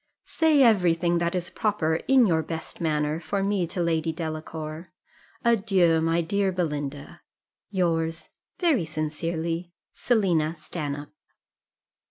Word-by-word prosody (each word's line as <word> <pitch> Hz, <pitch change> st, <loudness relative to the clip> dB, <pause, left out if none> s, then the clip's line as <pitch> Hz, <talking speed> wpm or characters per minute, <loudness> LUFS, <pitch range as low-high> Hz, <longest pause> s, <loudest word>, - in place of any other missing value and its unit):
Say 315 Hz, -4 st, +3 dB
every 185 Hz, -8 st, +4 dB
thing 170 Hz, 0 st, +1 dB
that 170 Hz, +1 st, -1 dB
is 175 Hz, -1 st, -3 dB
proper, 160 Hz, -7 st, 0 dB
in 265 Hz, -2 st, +6 dB
your 165 Hz, -5 st, +2 dB
best 160 Hz, +2 st, -7 dB
manner, 150 Hz, -1 st, 0 dB
for 195 Hz, +4 st, -2 dB
me 195 Hz, -3 st, 0 dB
to 175 Hz, +1 st, -2 dB
Lady 165 Hz, -1 st, 0 dB
Delacour. 155 Hz, 0 st, -6 dB, 0.6 s
"Adieu, 190 Hz, -8 st, +3 dB
my 165 Hz, +1 st, +2 dB
dear 195 Hz, +3 st, 0 dB
Belinda, 150 Hz, -5 st, -4 dB, 0.5 s
"Yours, 165 Hz, -4 st, -1 dB, 0.3 s
very 320 Hz, -, +2 dB
sincerely, 165 Hz, +2 st, -3 dB, 0.2 s
"SELINA 175 Hz, -9 st, +1 dB
STANHOPE." 150 Hz, -2 st, -6 dB
170 Hz, 120 wpm, -26 LUFS, 160-190 Hz, 0.6 s, in